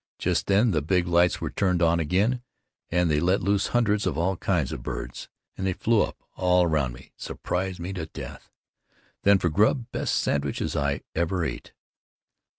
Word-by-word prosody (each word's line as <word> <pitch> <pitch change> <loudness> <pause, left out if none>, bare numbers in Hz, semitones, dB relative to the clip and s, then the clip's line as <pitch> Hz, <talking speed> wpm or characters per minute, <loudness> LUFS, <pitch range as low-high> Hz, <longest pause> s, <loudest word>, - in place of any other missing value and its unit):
Just - - 0
then 105 +4 +4
the 80 -4 +1
big 90 +3 +1
lights 85 0 +3
were - - -3
turned 90 -3 +1
on 85 0 +3
again 100 +10 +1 0.5
and 90 0 +2
they 75 -2 +2
let 95 +4 +1
loose 100 0 +2
hundreds 105 -4 +1
of 75 - -1
all 90 +3 +1
kinds 85 -6 0
of - - -5
birds, - - -6 0.3
and 95 - -2
they 95 - +1
flew 110 +3 +2
up - - -2 0.2
all 90 0 +3
around 75 -7 +1
me, 65 - -14
surprised 95 0 -3
me 90 +3 -4
to 85 -4 -5
death. - - -9 0.7
Then 100 0 +5
for 90 - 0
grub, 110 - +2
best - - -1
sandwiches 70 -1 -1
I 70 -1 0
ever 85 +1 0
ate. - - -6
90 Hz, 180 wpm, -26 LUFS, 80-100 Hz, 0.7 s, Then